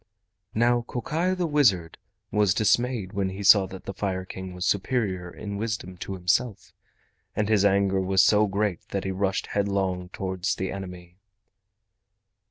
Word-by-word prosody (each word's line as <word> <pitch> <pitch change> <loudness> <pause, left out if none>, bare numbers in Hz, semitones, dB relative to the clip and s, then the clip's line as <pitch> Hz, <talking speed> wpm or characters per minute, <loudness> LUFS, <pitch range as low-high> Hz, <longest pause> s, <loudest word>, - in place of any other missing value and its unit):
Now 120 +2 +3
Kokai 165 +9 -1
the 180 -1 -1
wizard 110 - +2 0.3
was 105 -4 +3
dismayed 110 -2 +1
when 100 -1 0
he 95 +2 -6
saw 100 -1 +7
that 95 0 -10
the 100 - -5
Fire 95 -2 -3
King 95 -1 -8
was 90 +1 -3
superior 100 -4 0
in 100 +3 -6
wisdom 105 -4 -4
to 95 - -5
himself, 95 +5 -1 0.6
and 105 - 0
his 105 -2 +3
anger 100 -1 +3
was 95 0 +3
so 105 0 +4
great 100 -2 -1
that 100 - -2
he 95 - -2
rushed 95 0 -1
headlong 95 -3 -1
towards 95 +3 -2
the 95 -1 -3
enemy. 90 -2 -8
100 Hz, 155 wpm, -26 LUFS, 95-105 Hz, 0.6 s, saw